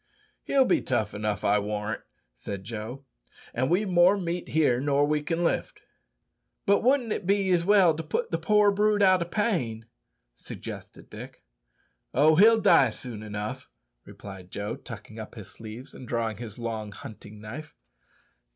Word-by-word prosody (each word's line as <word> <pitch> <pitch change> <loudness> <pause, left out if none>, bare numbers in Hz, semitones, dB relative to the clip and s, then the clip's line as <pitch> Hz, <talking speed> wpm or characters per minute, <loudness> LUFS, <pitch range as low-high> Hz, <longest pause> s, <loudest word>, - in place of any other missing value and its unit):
"He'll 270 -1 +4
be - - +2
tough 120 -6 -1
enough, 105 -1 -2
I 105 +1 +4
warrant," 105 +1 -3 0.3
said 100 -2 -6
Joe; 115 +5 -7 0.5
"an' 130 +3 0
we've 200 +4 +2
more 180 +2 +5
meat 175 -2 -3
here 145 -6 +3
nor 145 0 +2
we 150 0 +1
can 165 +3 -1
lift." 170 - -1 0.9
"But 200 0 +4
wouldn't 250 -3 +2
it 180 - -5
be 195 -1 +2
as 175 -2 +3
well 195 -4 +5
to 155 - -4
put 155 0 -2
the 165 - 0
poor 210 +4 +4
brute 205 0 +2
out 185 -2 +5
o' - - 0
pain?" 150 - -1 0.5
suggested - - -9
Dick. - - -10 0.7
"Oh, 155 +4 +5
he'll 220 +6 +7
die 170 - +6
soon 110 -1 -8
enough," 105 - -5 0.3
replied 95 -3 -11
Joe, 100 +3 -4
tucking 115 -4 -10
up 110 - -8
his 105 -5 -10
sleeves 115 +5 -10
and 125 - -10
drawing 115 -3 -1
his 115 -2 -8
long 110 -3 -4
hunting 105 0 -11
knife. 130 +9 -9
135 Hz, 160 wpm, -27 LUFS, 110-180 Hz, 0.9 s, he'll